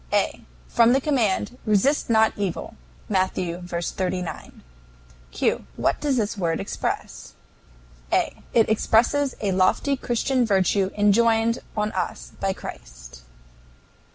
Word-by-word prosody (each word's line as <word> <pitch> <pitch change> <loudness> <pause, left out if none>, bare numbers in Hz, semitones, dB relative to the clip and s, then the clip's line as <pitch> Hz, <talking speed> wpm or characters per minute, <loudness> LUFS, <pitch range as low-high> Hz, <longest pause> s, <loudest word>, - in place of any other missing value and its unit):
A. - - 0 0.3
From 235 +1 +4
the 270 - +4
command, 250 -4 0
"Resist 220 +8 +2
not 220 -1 +4
evil." 200 -4 -3 0.3
(M. 190 -2 +2
v. 175 -1 -4
39.) 180 +1 -4 0.7
Q. - - -1
What - - 0
does 285 -3 +1
this 215 -2 -1
word 170 -5 -1
express? 195 - -4 0.8
A. - - +1 0.2
It 230 -2 +4
expresses 240 +6 +2
a 200 -2 0
lofty 185 +9 +2
Christian 255 0 0
virtue 195 -2 +2
enjoined 225 +2 +3 0.2
on 210 0 0
us 180 -2 -4
by 195 -1 0
Christ. - - -10
210 Hz, 120 wpm, -24 LUFS, 185-235 Hz, 0.8 s, From